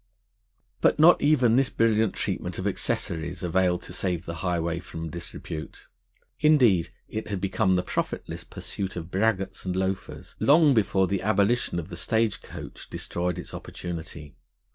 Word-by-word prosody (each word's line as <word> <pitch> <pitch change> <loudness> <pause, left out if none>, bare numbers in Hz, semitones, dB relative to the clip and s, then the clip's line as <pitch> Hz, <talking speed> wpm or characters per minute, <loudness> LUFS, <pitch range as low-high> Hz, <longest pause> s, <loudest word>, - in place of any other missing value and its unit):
But - - +4
not 160 +3 +7
even 130 -6 +4
this 135 -1 +3
brilliant 110 -2 +2
treatment - - -3
of - - -4
accessories 85 +2 -1
availed 90 0 +1
to - - -8
save 90 -1 -2
the 85 0 -5
highway 85 -2 -1
from 80 -2 -7
disrepute; 80 -2 -7 0.5
indeed, 125 - +4 0.2
it 110 - -5
had 100 -2 -3
become 95 0 +1
the 90 - +1
profitless - - -3
pursuit 95 -1 -5
of 85 0 -6
braggarts 95 -1 0
and 90 -1 -2
loafers, 95 0 -3
long 150 0 +6
before 100 -4 +3
the 95 0 -1
abolition 100 0 +2
of 85 +1 -4
the - - -7
stage 110 -1 +1
coach - - -9
destroyed 90 0 -2
its 90 - -7
opportunity. 80 -4 -7
95 Hz, 150 wpm, -26 LUFS, 85-110 Hz, 0.5 s, not